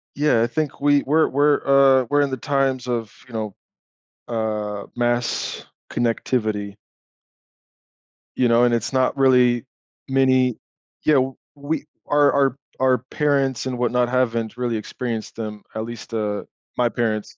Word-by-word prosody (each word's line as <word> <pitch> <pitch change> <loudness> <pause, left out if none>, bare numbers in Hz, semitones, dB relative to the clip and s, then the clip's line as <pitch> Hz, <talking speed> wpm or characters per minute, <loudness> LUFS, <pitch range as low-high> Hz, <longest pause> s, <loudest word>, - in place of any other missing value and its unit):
Yeah, 140 -6 +3
I 120 - +2
think 150 +1 -3
we 145 0 +4
we're 155 +3 +3
we're, 145 +2 +2 0.4
uh, - - -4
we're 145 0 +3
in 140 -1 0
the 130 - -2
times 135 -1 0
of, 115 -3 -3
you 120 - -15
know, 110 -3 -4 0.7
uh, 105 -3 -3
mass 120 0 -1 0.3
connectivity. 110 -4 -1 1.6
You 125 - +2
know, 115 +1 +4
and 120 -1 +3
it's 115 +3 -1
not 130 +2 +1
really 125 -2 +4 0.4
many 130 -2 +3 0.5
yeah, 150 -3 +5 0.4
we 145 +1 -3 0.2
our 145 -1 +4
our 140 -1 +2 0.2
our 130 -1 +4
parents, 140 -4 0
and 125 -1 -3
whatnot, 125 0 +1
haven't 115 -2 0
really 120 -2 -1
experienced 115 +1 -5
them, 105 -2 -6
at 110 0 -3
least, 115 0 -9
uh, 105 -2 -2 0.3
my 120 -1 +3
parents 110 -3 -2
125 Hz, 140 wpm, -22 LUFS, 115-135 Hz, 1.6 s, yeah